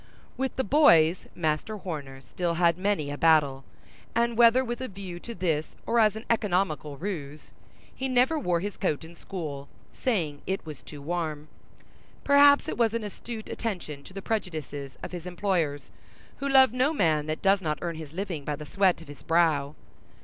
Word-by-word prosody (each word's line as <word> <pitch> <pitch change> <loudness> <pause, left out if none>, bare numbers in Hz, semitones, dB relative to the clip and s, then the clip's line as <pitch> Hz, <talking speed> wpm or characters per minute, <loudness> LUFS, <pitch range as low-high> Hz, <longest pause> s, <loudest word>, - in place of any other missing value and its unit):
With 265 +1 -2
the 260 - 0
boys 180 - +5
Master 160 +6 -1
Horner 145 -8 -6
still 170 +5 -2
had 170 -1 +3
many 185 -6 -1
a 145 - -6
battle, 150 -5 +4 0.5
and 235 0 +2
whether 240 +3 +6
with 240 +1 -4
a 260 - -3
view 190 -4 -8
to 235 +5 -8
this, 160 -5 -1
or 235 - +2
as 215 -2 +4
an 220 - -7
economical 180 - 0
ruse, 150 -4 -6 0.4
he 265 0 -3
never 255 +5 +3
wore 175 - 0
his 205 +1 -4
coat 155 -7 -1
in 165 +1 -11
school, 155 -6 -6 0.3
saying 165 - -1
it 190 -2 -2
was 150 -5 -8
too 145 -2 -11
warm. 155 -2 -3 0.7
Perhaps 285 +1 +6
it 315 - -4
was 230 -1 +3
an 230 - -2
astute 220 +2 -7
attention 180 -10 -4
to - - -11
the 195 - -6
prejudices 155 - -4
of - - -5
his 175 -1 -6
employers, 175 -6 -1 0.5
who 280 - -2
love 265 -3 +6
no 260 +5 +2
man 155 - +1
that 155 0 -3
does 195 0 +4
not 155 -3 -1
earn 170 -1 -2
his 155 -3 -8
living 175 -4 -4
by 150 +1 -2
the 150 +1 -9
sweat 190 -1 +2
of - - -17
his 145 0 -11
brow. 155 -4 +2
175 Hz, 185 wpm, -27 LUFS, 155-220 Hz, 0.7 s, whether